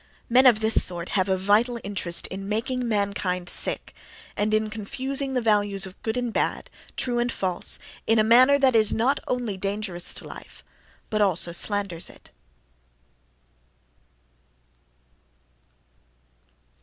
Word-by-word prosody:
Men 255 Hz, +2 st, +6 dB
of 225 Hz, -3 st, +4 dB
this 220 Hz, 0 st, +7 dB
sort 175 Hz, -1 st, -3 dB
have 190 Hz, -1 st, 0 dB
a 190 Hz, -, +1 dB
vital 215 Hz, +6 st, +1 dB
interest 185 Hz, -4 st, -2 dB
in 195 Hz, +1 st, -6 dB
making 245 Hz, +3 st, -2 dB
mankind 200 Hz, -4 st, -2 dB
sick, -, -, -1 dB, 0.4 s
and 210 Hz, +1 st, -1 dB
in 215 Hz, 0 st, 0 dB
confusing 265 Hz, +5 st, -3 dB
the 250 Hz, -, 0 dB
values 205 Hz, -3 st, +1 dB
of 190 Hz, -1 st, -12 dB
"good" 220 Hz, +2 st, -3 dB
and 245 Hz, -2 st, -3 dB
"bad," -, -, -2 dB, 0.3 s
"true" 240 Hz, -1 st, -1 dB
and 240 Hz, 0 st, 0 dB
"false" 185 Hz, -5 st, 0 dB, 0.3 s
in 225 Hz, -, +3 dB
a 215 Hz, -, +4 dB
manner 255 Hz, +5 st, +5 dB
that 265 Hz, -3 st, +3 dB
is 215 Hz, -2 st, +6 dB
not 260 Hz, +5 st, +1 dB
only 240 Hz, -6 st, -3 dB
dangerous 195 Hz, -2 st, -3 dB
to -, -, -4 dB
life, -, -, -12 dB, 0.5 s
but 215 Hz, -1 st, 0 dB
also 180 Hz, -3 st, +2 dB
slanders 195 Hz, -1 st, -2 dB
it. -, -, -17 dB
215 Hz, 135 wpm, -24 LUFS, 195-240 Hz, 0.5 s, this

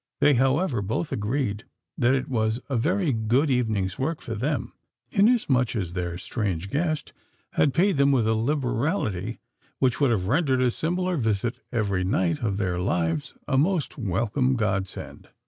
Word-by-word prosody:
They, 145 Hz, -, +5 dB
however, 135 Hz, -, +2 dB
both 110 Hz, -, -2 dB
agreed 105 Hz, 0 st, -1 dB, 0.3 s
that 130 Hz, +1 st, +3 dB
it 130 Hz, -, -2 dB
was 110 Hz, -2 st, 0 dB
a 135 Hz, -, -1 dB
very 165 Hz, -, +1 dB
good 120 Hz, +7 st, +2 dB
evening's 110 Hz, -7 st, 0 dB
work 155 Hz, +4 st, -1 dB
for 115 Hz, -, -6 dB
them; 130 Hz, +4 st, -2 dB, 0.4 s
inasmuch 195 Hz, -, +3 dB
as 90 Hz, -6 st, -2 dB
their 90 Hz, -1 st, -3 dB
strange 95 Hz, -2 st, -3 dB
guest 155 Hz, 0 st, -1 dB, 0.4 s
had 145 Hz, -, +3 dB
paid 180 Hz, +5 st, +2 dB
them 140 Hz, 0 st, +4 dB
with 120 Hz, -5 st, +2 dB
a 110 Hz, -, +3 dB
liberality 120 Hz, -, -1 dB, 0.4 s
which 130 Hz, -2 st, +1 dB
would 140 Hz, -, +4 dB
have 105 Hz, -6 st, +1 dB
rendered 135 Hz, -, +2 dB
a 125 Hz, -, +3 dB
similar 180 Hz, +5 st, -1 dB
visit 110 Hz, -1 st, 0 dB
every 100 Hz, -6 st, 0 dB
night 90 Hz, -3 st, +1 dB
of 100 Hz, -4 st, -1 dB
their 90 Hz, -4 st, -1 dB
lives 85 Hz, -4 st, -1 dB
a 130 Hz, -, +2 dB
most 170 Hz, 0 st, +1 dB
welcome 120 Hz, -, 0 dB
God 100 Hz, -4 st, 0 dB
send. -, -, -10 dB
120 Hz, 165 wpm, -25 LUFS, 100-140 Hz, 0.4 s, They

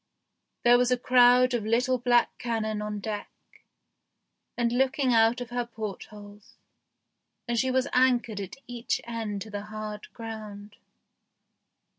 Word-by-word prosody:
There 245 Hz, 0 st, +6 dB
was 250 Hz, 0 st, +2 dB
a 250 Hz, -, +2 dB
crowd 250 Hz, 0 st, +5 dB
of 235 Hz, -3 st, 0 dB
little 245 Hz, +4 st, +1 dB
black 240 Hz, 0 st, +2 dB
cannon 220 Hz, -3 st, -2 dB
on 210 Hz, 0 st, -4 dB
deck 210 Hz, 0 st, -4 dB, 1.3 s
and 235 Hz, -1 st, +1 dB
looking 260 Hz, +1 st, +1 dB
out 225 Hz, +2 st, +4 dB
of 245 Hz, -1 st, -7 dB
her 245 Hz, 0 st, -1 dB
port 220 Hz, -4 st, -6 dB
holes, 205 Hz, -1 st, -14 dB, 0.9 s
and 240 Hz, -, -1 dB
she 260 Hz, -, +1 dB
was 260 Hz, +1 st, +1 dB
anchored 245 Hz, -5 st, +2 dB
at 195 Hz, -, -7 dB
each 240 Hz, 0 st, -3 dB
end 225 Hz, -4 st, -4 dB
to 220 Hz, -, -12 dB
the 205 Hz, 0 st, -5 dB
hard 215 Hz, 0 st, -7 dB
ground. 215 Hz, -3 st, -9 dB
230 Hz, 140 wpm, -27 LUFS, 210-245 Hz, 1.3 s, There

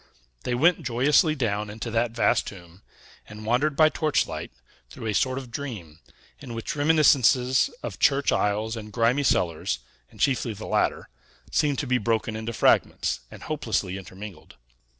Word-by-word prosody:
They 125 Hz, -, 0 dB
went 165 Hz, +7 st, +3 dB
joyously 145 Hz, +6 st, +3 dB
down 105 Hz, -6 st, -1 dB
into 110 Hz, +2 st, -6 dB
that 115 Hz, +1 st, +1 dB
vast 115 Hz, +1 st, +1 dB
tomb, 90 Hz, -1 st, -11 dB, 0.5 s
and 105 Hz, +1 st, -10 dB
wandered 130 Hz, +6 st, +1 dB
by 155 Hz, +1 st, +6 dB
torchlight 155 Hz, -2 st, -1 dB, 0.4 s
through 115 Hz, -, -9 dB
a 110 Hz, -, -1 dB
sort 130 Hz, +5 st, +1 dB
of 130 Hz, -3 st, -7 dB
dream, 105 Hz, -, -7 dB, 0.4 s
in 125 Hz, -5 st, -8 dB
which 115 Hz, -, -4 dB
reminiscences 135 Hz, -4 st, +4 dB
of -, -, -6 dB
church 140 Hz, 0 st, +3 dB
aisles 105 Hz, +2 st, 0 dB
and 105 Hz, -2 st, -8 dB
grimy 120 Hz, +5 st, +2 dB
cellars 90 Hz, -, 0 dB, 0.3 s
and -, -, -19 dB
chiefly 130 Hz, -4 st, +1 dB
the 100 Hz, -, -9 dB
latter -, -, 0 dB, 0.4 s
seemed 145 Hz, -3 st, +1 dB
to -, -, -2 dB
be 125 Hz, -1 st, +1 dB
broken 110 Hz, 0 st, -1 dB
into 110 Hz, +1 st, -4 dB
fragments, 115 Hz, -, +2 dB
and -, -, -12 dB
hopelessly 110 Hz, -11 st, -2 dB
intermingled. 95 Hz, +1 st, -10 dB
115 Hz, 155 wpm, -25 LUFS, 105-135 Hz, 0.5 s, by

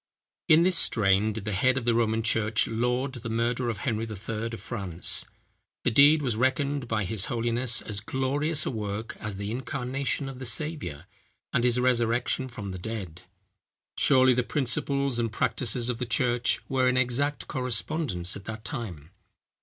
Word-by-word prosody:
In 160 Hz, +2 st, +6 dB
this 180 Hz, -2 st, +3 dB
strain 105 Hz, -1 st, +2 dB
did 105 Hz, -1 st, -6 dB
the 105 Hz, -, -2 dB
head 130 Hz, +7 st, +2 dB
of 125 Hz, -, -2 dB
the 120 Hz, -, +3 dB
Roman 115 Hz, -1 st, +1 dB
church 110 Hz, -1 st, +2 dB
laud 125 Hz, +4 st, 0 dB
the 120 Hz, -3 st, -6 dB
murder 120 Hz, +2 st, 0 dB
of 110 Hz, -, -2 dB
Henry 115 Hz, 0 st, -2 dB
III. 110 Hz, +1 st, -4 dB
of 115 Hz, -1 st, -6 dB
France. 95 Hz, -7 st, -1 dB, 0.6 s
The 125 Hz, -, +2 dB
deed 145 Hz, +5 st, +6 dB
was 120 Hz, -5 st, 0 dB
reckoned 130 Hz, +2 st, 0 dB
by 110 Hz, -2 st, 0 dB
his 95 Hz, +1 st, -2 dB
holiness 120 Hz, +1 st, +1 dB
as 105 Hz, -2 st, -5 dB
glorious 140 Hz, +7 st, -1 dB
a -, -, -1 dB
work 105 Hz, -1 st, -4 dB
as 105 Hz, -3 st, -5 dB
the 100 Hz, +1 st, -4 dB
incarnation 135 Hz, +2 st, -2 dB
of 135 Hz, -2 st, -7 dB
the 130 Hz, -, -5 dB
Saviour, 130 Hz, -, -2 dB, 0.5 s
and 120 Hz, -, +2 dB
his 125 Hz, 0 st, +3 dB
resurrection 125 Hz, +1 st, +1 dB
from 105 Hz, -6 st, -7 dB
the 95 Hz, -, -6 dB
dead. 95 Hz, -5 st, -6 dB, 0.7 s
Surely, 130 Hz, -1 st, +5 dB
the 125 Hz, -, +2 dB
principles 135 Hz, +1 st, 0 dB
and 115 Hz, -2 st, 0 dB
practices 120 Hz, +1 st, 0 dB
of 125 Hz, -2 st, -2 dB
the 125 Hz, -, -2 dB
church, 120 Hz, +1 st, +2 dB
were 130 Hz, -1 st, +2 dB
in 125 Hz, -, +1 dB
exact 130 Hz, +4 st, 0 dB
correspondence 125 Hz, -, -1 dB
at 100 Hz, -, -9 dB
that 110 Hz, 0 st, -7 dB
time. 90 Hz, -, -6 dB
120 Hz, 170 wpm, -27 LUFS, 110-130 Hz, 0.7 s, In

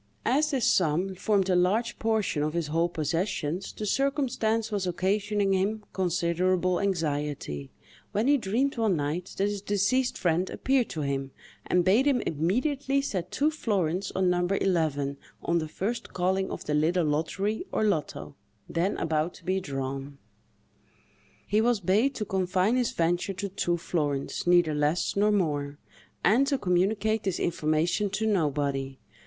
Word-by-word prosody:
As 295 Hz, +5 st, +2 dB
this 270 Hz, -6 st, 0 dB
sum 180 Hz, +2 st, +2 dB
formed 195 Hz, +1 st, +1 dB
a 185 Hz, -, +2 dB
large 210 Hz, +7 st, +1 dB
portion 220 Hz, -8 st, 0 dB
of 150 Hz, +1 st, -1 dB
his 170 Hz, -2 st, 0 dB
whole 165 Hz, +3 st, +1 dB
possessions, 170 Hz, +1 st, -2 dB
the 215 Hz, -, -6 dB
circumstance 240 Hz, -3 st, 0 dB
was 200 Hz, -3 st, -1 dB
occasioning 200 Hz, +2 st, 0 dB
him 205 Hz, +3 st, 0 dB
considerable 180 Hz, 0 st, +1 dB
anxiety, 145 Hz, -, -2 dB, 0.4 s
when 210 Hz, +3 st, 0 dB
he 285 Hz, +2 st, +5 dB
dreamed 255 Hz, +3 st, 0 dB
one 220 Hz, -5 st, +2 dB
night 155 Hz, +4 st, -3 dB
that 195 Hz, -, +2 dB
his 205 Hz, -1 st, -3 dB
deceased 205 Hz, +6 st, +1 dB
friend 175 Hz, +1 st, +1 dB
appeared 260 Hz, -3 st, +1 dB
to 155 Hz, -, -4 dB
him, 135 Hz, -1 st, -2 dB, 0.4 s
and 180 Hz, -1 st, +2 dB
bade 225 Hz, +9 st, +4 dB
him 270 Hz, -3 st, +3 dB
immediately 260 Hz, -, 0 dB
set 190 Hz, -11 st, -3 dB
two 300 Hz, +2 st, +1 dB
florins 195 Hz, -, -1 dB
on 190 Hz, -1 st, +2 dB
No. 175 Hz, 0 st, +2 dB
11, 160 Hz, -7 st, 0 dB, 0.3 s
on 170 Hz, 0 st, +1 dB
the 155 Hz, -, -3 dB
first 230 Hz, +9 st, -4 dB
calling 190 Hz, +1 st, 0 dB
of -, -, -6 dB
the 150 Hz, -, -1 dB
little 160 Hz, +3 st, +2 dB
lottery, 180 Hz, -, -1 dB
or -, -, 0 dB
loto, 150 Hz, -, -1 dB, 0.3 s
then 175 Hz, +4 st, -1 dB
about 160 Hz, +1 st, -1 dB
to -, -, -16 dB
be 190 Hz, +1 st, +1 dB
drawn. 135 Hz, -2 st, -5 dB, 1.3 s
He 210 Hz, +2 st, +2 dB
was 235 Hz, -1 st, +2 dB
bade 205 Hz, +9 st, +2 dB
to 215 Hz, -, -3 dB
confine 190 Hz, +3 st, +1 dB
his 250 Hz, -2 st, +1 dB
venture 175 Hz, +3 st, 0 dB
to 200 Hz, +2 st, -4 dB
two 175 Hz, -2 st, -1 dB
florins, 150 Hz, -4 st, -2 dB
neither 175 Hz, -3 st, +4 dB
less 150 Hz, +3 st, 0 dB
nor 205 Hz, +1 st, +3 dB
more; 145 Hz, -7 st, 0 dB, 0.5 s
and 255 Hz, +7 st, +4 dB
to 280 Hz, -1 st, +1 dB
communicate 205 Hz, +2 st, +1 dB
this 190 Hz, -4 st, -2 dB
information 165 Hz, +4 st, 0 dB
to 210 Hz, +3 st, -2 dB
nobody. 140 Hz, -8 st, 0 dB
185 Hz, 155 wpm, -27 LUFS, 160-215 Hz, 1.3 s, he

